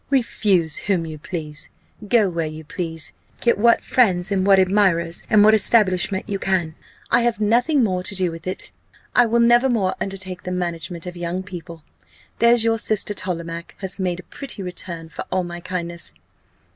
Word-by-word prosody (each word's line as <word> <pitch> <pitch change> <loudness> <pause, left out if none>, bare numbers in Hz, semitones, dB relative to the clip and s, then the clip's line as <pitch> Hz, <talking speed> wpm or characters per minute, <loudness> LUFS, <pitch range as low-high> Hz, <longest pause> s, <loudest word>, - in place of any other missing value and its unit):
Refuse 200 - +1
whom 185 -5 -1
you 155 -1 -7
please 150 -3 -3 0.4
go 220 -2 +4
where 165 -3 -2
you 155 +1 -8
please 165 0 -3 0.3
get 235 -3 +2
what 235 +2 +4
friends, 190 -7 +2
and 195 -1 +1
what 195 -1 +6
admirers, 185 -3 +2
and 210 -1 +6
what 215 +1 +6
establishment 195 -3 +3
you 200 -1 -3
can 180 -5 0 0.4
I 240 - +5
have 235 -2 0
nothing 245 +7 +2
more 185 -4 0
to 200 +2 -2
do 180 -2 +1
with 165 +1 -9
it 185 - -2 0.4
I 245 -1 +5
will 235 +1 +2
never 240 +2 +5
more 205 -6 +1
undertake 190 -2 -5
the - - -6
management 175 -1 -4
of 180 0 -7
young 175 +2 -3
people. 170 -3 -9 0.6
There's 235 0 +5
your 225 0 +2
sister 210 -1 0
Tollemache 170 -3 -5
has 190 0 -2
made 180 -2 -1
a - - -9
pretty 250 -5 -6
return 175 -2 -6
for 150 - -6
all 185 0 +1
my 175 0 -6
kindness! 170 -1 -2
185 Hz, 180 wpm, -21 LUFS, 170-210 Hz, 0.6 s, what